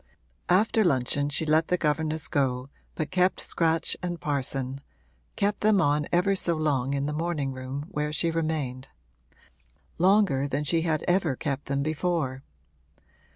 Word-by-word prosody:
After 215 +4 +4
luncheon 145 -3 +1
she 145 +3 0
let 155 +1 +3
the 180 - +1
governess 155 0 0
go 130 -2 0 0.3
but 155 -2 -3
kept 185 0 +2
Scratch 165 -1 0
and 175 -2 -3
Parson 135 -2 -3 0.5
kept 205 0 0
them 210 -1 +4
on 150 -3 +2
ever 180 +3 +3
so 170 -3 0
long 140 -4 0
in 140 0 -1
the 150 - -2
morning 155 -3 -1
room 130 +3 -5
where 150 -5 -2
she 165 +2 +1
remained; 155 -6 -2 1.1
longer 180 -7 +3
than 140 +1 -1
she 165 +3 +1
had 160 -2 0
ever 175 -6 +2
kept 140 +1 -3
them 140 0 0
before. 155 -4 -1
155 Hz, 150 wpm, -27 LUFS, 140-175 Hz, 1.1 s, After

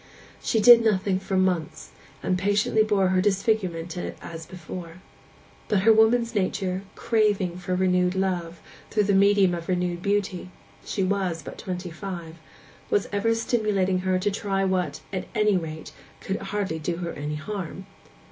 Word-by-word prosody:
She 225 - +1
did 235 +1 +8
nothing 195 -3 +1
for 190 0 -2
months, 180 -4 -1 0.3
and 185 - +1
patiently 205 +3 +2
bore 205 -3 +2
her 185 0 +3
disfigurement 190 -4 0 0.2
as 165 -1 -8
before. 175 -1 -8 0.7
But 205 -3 +2
her 225 +3 +6
woman's 230 +2 +3
nature, 190 -2 -1
craving 205 -6 +1
for 180 0 -2
renewed 180 0 +2
love, 175 -3 -2 0.3
through 210 - +2
the 200 0 +1
medium 200 -1 +4
of 170 0 -5
renewed 180 -1 -1
beauty 200 -2 -1 0.3
(she 195 - -2
was 185 -4 -1
but - - -9
twenty 180 -1 -5
five), 170 -2 -7 0.5
was 205 - +1
ever 210 +3 +1
stimulating 210 -5 +1
her 185 0 +1
to 195 +3 0
try 195 -1 -1
what, 185 -2 -1
at 185 - -3
any 210 -2 +3
rate, 160 -3 -4 0.3
could 195 - -3
hardly 195 -4 -3
do 170 +2 -2
her 170 -1 -4
any 150 +1 -4
harm. 190 +2 -6
190 Hz, 155 wpm, -25 LUFS, 180-205 Hz, 0.7 s, did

